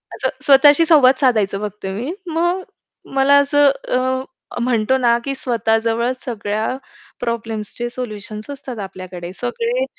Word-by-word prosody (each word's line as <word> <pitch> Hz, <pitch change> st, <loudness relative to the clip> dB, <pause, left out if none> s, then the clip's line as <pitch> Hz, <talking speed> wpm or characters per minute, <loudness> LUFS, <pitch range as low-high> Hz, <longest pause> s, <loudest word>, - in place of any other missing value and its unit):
असं -, -, -1 dB, 0.2 s
स्वतःशी 290 Hz, +3 st, +7 dB
संवाद 270 Hz, -5 st, +6 dB
साधायचं 215 Hz, -7 st, +2 dB
फक्त 205 Hz, -1 st, -12 dB
मी. 215 Hz, +10 st, -3 dB, 0.2 s
मग 345 Hz, +3 st, 0 dB, 0.5 s
मला 275 Hz, +1 st, +5 dB
असं 285 Hz, 0 st, +4 dB, 0.3 s
अ, 260 Hz, +1 st, 0 dB, 0.4 s
म्हणतो 235 Hz, 0 st, +1 dB
ना 235 Hz, -2 st, +3 dB
की 275 Hz, -, -2 dB
स्वतः 225 Hz, -3 st, 0 dB
जवळ 235 Hz, +2 st, 0 dB
सगळ्या 215 Hz, -4 st, -3 dB, 0.5 s
प्रॉब्लेम्सचे 230 Hz, -1 st, -3 dB
सोल्युशन्स 215 Hz, -2 st, -7 dB
असतात 265 Hz, -5 st, -7 dB
आपल्याकडे, 185 Hz, -2 st, -8 dB
सगळे 465 Hz, -, -2 dB
245 Hz, 125 wpm, -19 LUFS, 215-275 Hz, 0.5 s, स्वतःशी